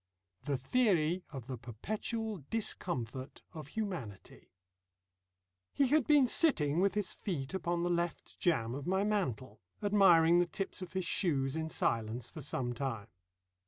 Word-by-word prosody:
THE 145 -2 0
THEORY 180 - +2
OF 135 -6 -7
THE 130 -1 -5
PERPETUAL 215 - -4
DISCOMFORT 135 - -3
OF 155 -4 -8
HUMANITY 160 - -6 1.2
He 275 - +3
had 300 -2 +3
been 295 -3 +6
sitting 170 - +2
with 195 +1 +2
his 210 -3 -1
feet 145 -8 -4
upon 175 -2 -1
the 175 - +1
left 170 -1 -2
jamb 125 -10 +1
of 140 +3 -5
my 190 +2 +2
mantel, 130 - -2 0.2
admiring 175 -5 +6
the 175 - +2
tips 195 +1 -4
of 185 - -7
his 190 -2 -1
shoes 140 -7 +1
in 160 0 -2
silence 115 -2 -1
for 155 - -8
some 125 -2 -2
time. 120 -5 -4
170 Hz, 145 wpm, -33 LUFS, 130-200 Hz, 1.2 s, been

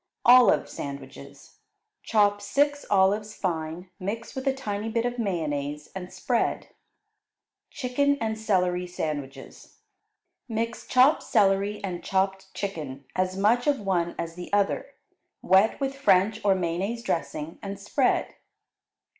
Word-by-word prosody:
Olive 245 - +7
Sandwiches 140 0 -9 0.4
Chop 205 -2 +2
six 285 +6 0
olives 205 +2 +2
fine, 170 0 -3
mix 205 +5 -4
with 265 +1 -5
a - - +5
tiny 220 -5 -4
bit 230 +1 0
of 245 0 -2
mayonnaise 150 -7 -2
and 185 -1 -6
spread. - - -1 1.0
Chicken 280 +3 0
and 220 -1 -1
Celery 180 -5 0
Sandwiches 145 -6 -6 0.7
Mix 230 0 -3
chopped 265 +4 +5
celery 200 +1 +2
and 180 -3 -4
chopped 190 0 -1
chicken, 150 -9 -5
as 185 0 0
much 230 +6 +2
of 290 -2 +2
one 180 -4 -1
as 165 0 -4
the 175 +1 -9
other, 205 - +1 0.6
wet 195 +4 +4
with 270 0 -1
French 220 -5 +2
or 200 -2 +4
mayonnaise 190 +6 -2
dressing 155 -3 -3
and 200 0 -6
spread. 250 +6 +1
195 Hz, 125 wpm, -26 LUFS, 175-225 Hz, 1.0 s, Olive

